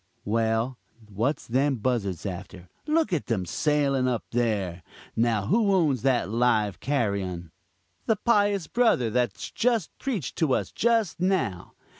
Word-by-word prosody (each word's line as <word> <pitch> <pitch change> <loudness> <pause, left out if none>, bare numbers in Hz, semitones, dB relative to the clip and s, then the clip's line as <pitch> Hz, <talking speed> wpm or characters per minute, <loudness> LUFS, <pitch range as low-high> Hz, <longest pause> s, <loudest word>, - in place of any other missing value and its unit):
Well, 115 +3 0 0.3
what's 125 +9 -1
them 135 +4 +1
buzzards 110 -7 -2
after? 90 -1 -7 0.2
look 310 - +1
at 160 - -1
them 105 -6 -1
sailing 140 - +1
up 120 -2 -1
there. 105 -7 -1 0.3
Now 115 -3 +1
who 205 - +2
owns 150 - +2
that 130 -5 +2
live 110 -2 +1
carrion? 100 - -2 0.6
the 225 - +3
pious 205 -4 +2
brother 150 - +2
that's 125 +1 -1
just 230 -6 0
preached 225 - -3
to 150 -6 +2
us - - -2
just 225 -7 +1
now. 175 - -1
125 Hz, 135 wpm, -26 LUFS, 105-175 Hz, 0.6 s, the